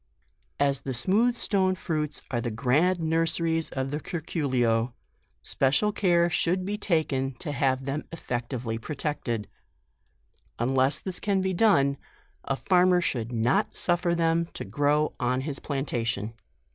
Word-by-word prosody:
» - - -43
As 135 -1 -2
the 135 -2 -3
smooth 215 - +3
stone 190 -5 +2
fruits 155 -4 -3
are 120 -2 0
the 120 - -2
grand 145 +11 +2
nurseries 165 0 0
of 135 0 -3
the 150 - -2
curculio, 130 -9 -1 0.5
special 145 +11 +2
care 175 -4 +3
should 180 +2 0
be 205 +2 -2
taken 155 -9 0
to 145 +5 -5
have 135 -2 0
them 140 +2 -3
effectually 120 -6 -4
protected. 130 -5 -3 1.1
Unless 130 +4 +1
this 185 -2 -4
can 200 -2 +1
be 190 0 0
done, 140 -9 +3 0.5
a 135 - -1
farmer 180 +3 +3
should 120 -9 -2
not 120 +2 +1
suifer 175 0 +1
them 165 0 +2
to - - -5
grow 145 +1 +1
on 125 +1 0
his 140 0 -4
plantation. 115 -6 -2
150 Hz, 140 wpm, -27 LUFS, 130-175 Hz, 1.1 s, smooth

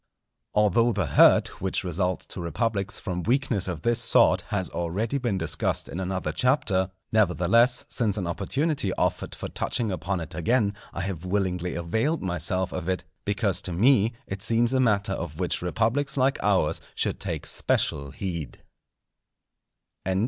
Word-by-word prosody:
Although 105 +3 +3
the 100 -3 0
hurt 70 - +4
which 95 0 0
results 90 0 -1
to - - -6
republics 105 +3 -2
from 90 -4 -3
weakness 120 -3 +1
of 85 -4 -4
this 120 0 +2
sort 115 - +4
has 95 -3 -1
already 100 +10 -2
been 120 -7 -1
discussed - - -1
in 85 - -6
another 95 0 -2
Chapter, 100 -8 +1 0.2
nevertheless, 110 +4 +3
since 110 -4 0
an 95 - -2
opportunity 105 - -1
offered 90 0 -1
for - - -5
touching 115 -4 -1
upon 95 +1 -2
it 80 - -7
again, 100 +3 +1 0.2
I 85 - -4
have 95 -3 -4
willingly 90 -2 -1
availed 110 - -1
myself 95 +1 -1
of 90 -1 -4
it, 95 - -1 0.2
because 100 -2 0
to 90 - -3
me 115 +3 +4
it 95 0 -6
seems 115 +3 +2
a 130 - +3
matter 100 -5 +2
of 80 -4 -5
which 90 0 -1
republics 115 +10 0
like 135 +1 +2
ours 95 -7 +1
should - - -1
take - - -4
special 70 -1 0
heed. 85 -2 -5
95 Hz, 155 wpm, -26 LUFS, 90-115 Hz, 0.2 s, hurt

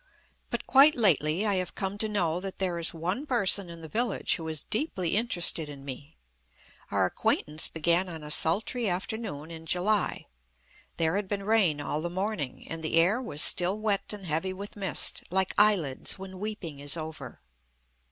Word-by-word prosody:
But - - -3
quite 280 +3 +6
lately 180 - +3
I 200 -2 +1
have 185 -1 -3
come 195 0 -4
to 220 - +3
know 175 -5 0
that 190 0 -7
there 180 -3 -1
is 165 - +1
one 180 - -3
person 200 -7 +3
in 170 -1 -10
the 160 - -8
village 230 +6 0
who 160 - -7
is 155 -2 -3
deeply 195 - -1
interested 175 -8 +3
in 140 -1 -10
me. 140 +3 -8 0.7
Our - - +2
acquaintance 155 +1 0
began 170 +3 +1
on 160 -3 -8
a 150 - -5
sultry 210 +9 +2
afternoon 180 -5 -4
in 165 0 -9
July. 195 +4 0 0.7
There 165 +3 +1
had 205 -1 -3
been 200 0 -3
rain 195 -8 +2
all 145 +1 -3
the 175 - -3
morning, 185 - -4
and 165 0 -6
the 160 - -1
air 180 +9 +3
was 155 - +2
still 180 +3 +3
wet 215 -2 -1
and 205 -2 -6
heavy 170 +4 -2
with 200 +2 -8
mist, 195 -5 -1
like 190 +1 0
eyelids 195 -11 +3
when 190 -1 -9
weeping 190 -8 -5
is 145 +3 0
over. 155 - -7
180 Hz, 180 wpm, -28 LUFS, 160-205 Hz, 0.7 s, quite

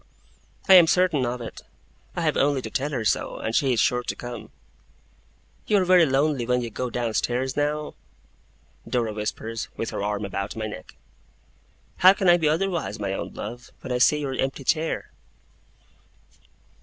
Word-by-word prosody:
'I 190 - +8
am 175 -3 +9
certain 165 -7 +2
of 120 +1 -4
it. 115 - -8 0.5
I - - -2
have - - +1
only 140 -1 +2
to - - -6
tell 135 +3 -1
her 125 -6 -3
so, - - 0
and 110 - -4
she 135 -2 +2
is 115 - 0
sure 125 +2 +2
to - - -4
come.' 120 -1 -8 1.2
'You 210 - +3
are 190 - +2
very 180 -2 +5
lonely 140 -1 +1
when 125 0 +1
you 115 - -5
go 125 +3 -3
downstairs, 120 +2 -1
now?' 150 +1 -1 1.0
Dora 115 -3 0
whispers, 110 +1 -4
with 115 - -3
her - - -4
arm 105 0 -2
about 100 0 -4
my 110 -1 -3
neck. 105 - -9 1.0
'How 185 +1 +8
can 195 -1 -1
I 175 - +7
be 160 -3 +1
otherwise, 170 - -1
my 100 -2 -2
own - - -5
love, 120 +1 -7
when - - -7
I 125 - 0
see 150 +4 +4
your 135 -2 -3
empty 135 +1 -2
chair? 160 +4 -1
130 Hz, 175 wpm, -24 LUFS, 115-155 Hz, 1.2 s, am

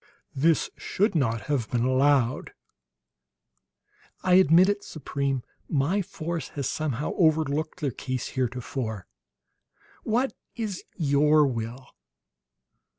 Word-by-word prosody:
"This 155 +4 +2
should 205 +2 0
not 115 -8 +1
have 125 0 -2
been 120 -1 0
allowed!" 130 -1 +2 1.7
"I 185 - +3
admit 180 0 +6
it, 205 0 0
Supreme; 140 -3 -3 0.3
my 155 +8 +1
force 170 -4 -4
has 140 - -1
somehow 150 -2 -2
overlooked 155 -1 +1
their 140 -3 0
case, 130 +1 -4
heretofore. 125 - -3 1.0
What 245 +5 0 0.2
is 215 -5 -4
your 150 0 +4
will?" 120 0 -4
145 Hz, 100 wpm, -26 LUFS, 130-165 Hz, 1.7 s, admit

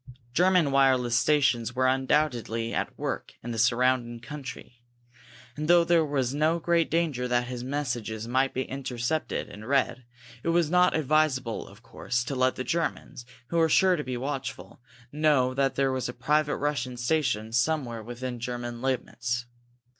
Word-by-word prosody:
German 180 -2 +3
wireless 130 -3 +3
stations 120 -3 +2
were 130 0 +2
undoubtedly 130 -4 +1
at - - -3
work - - -4
in 120 - -5
the 115 - -3
surrounding 120 0 +2
country, 125 -2 -9 0.7
and, 150 +1 -4
though 175 0 +6
there 170 -1 +3
was 135 -4 -1
no 155 +3 +2
great 170 0 +1
danger 155 -7 0
that 125 0 +1
his 125 -1 -6
messages 120 -5 -3
might 130 +2 +1
be 130 - -2
intercepted 130 +3 -3
and 105 +2 -10
read, 135 -1 +1 0.4
it 165 - -2
was 165 -2 +2
not 180 0 +4
advisable, 145 -5 +1
of 100 +4 -16
course, 120 0 -2
to 130 - -4
let 130 0 +2
the 130 - -3
Germans, 150 -5 -3 0.2
who 170 - -1
were 165 -1 +4
sure 190 +1 +4
to 150 - -3
be 130 -2 -4
watchful, 135 -1 -5 0.3
know 145 -4 +2
that 135 0 +1
there 135 -1 +2
was 130 -1 -2
a - - -5
private 150 +2 +1
Russian 130 -4 -2
station 120 -4 0
somewhere 120 -2 0
within 120 +2 -6
German 120 0 -5
limits. 125 -2 -2
130 Hz, 160 wpm, -27 LUFS, 120-150 Hz, 0.7 s, though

